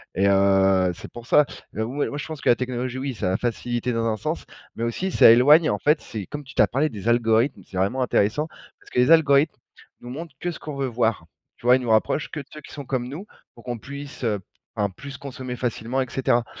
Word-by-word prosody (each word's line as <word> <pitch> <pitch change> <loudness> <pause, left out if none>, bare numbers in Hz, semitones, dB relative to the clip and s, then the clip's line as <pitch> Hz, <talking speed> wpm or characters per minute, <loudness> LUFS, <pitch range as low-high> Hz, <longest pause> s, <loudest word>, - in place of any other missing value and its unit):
et 100 +1 +3
heu, 95 -1 +4
c'est - - -11
pour 120 -1 -10
ça. 150 - +5 0.3
Heu, 110 - -1
moi 135 +5 -2
moi 145 - -5
je 150 - -5
pense 155 -2 -7
que - - +1
la 120 - +6
technologie, 125 0 -3
oui 135 0 -3
ça 100 -5 -2
a - - +1
facilité 120 0 -2
dans 115 0 0
un 110 - 0
sens, - - -3 0.3
mais 115 - -4
aussi 120 +12 -2
ça - - +7
éloigne, 145 +7 +6
en 105 - 0
fait. 150 +1 +2
C'est 105 -4 -6
comme 145 +5 -7
tu 130 - -13
tu - - +4
as - - +5
parlé 140 +5 0
des 105 -4 -7
algorithmes, 120 +2 +2
c'est 95 - -8
vraiment 100 +8 0
intéressant 125 +4 +1 0.3
parce - - -19
que - - 0
les 125 +5 +4
algorithmes 150 -2 +5 0.5
nous 120 - -9
montrent 155 +3 -7
que 175 - -2
ce 165 - -9
qu'on 150 -2 -7
veut 135 -1 -1
voir, 115 -7 0 0.3
tu - - -17
vois? 125 - +7
Ils 130 - 0
nous 120 - -4
rapprochent 110 +7 +2
que 155 - -5
de 140 - -8
ceux 150 - -9
qui - - -14
sont 145 -2 -7
comme 125 -1 -2
nous 165 +9 -7 0.3
pour 120 - -16
qu'on 120 -1 -3
puisse, 140 +3 -9
heu, 105 -4 0
p 95 - -22 0.3
enfin 100 -1 0
plus 140 +8 -10
consommer 130 -2 -7
facilement 120 +1 -2
et 130 - -3
cetera. 120 -2 +1
125 Hz, 255 wpm, -24 LUFS, 110-140 Hz, 0.5 s, ça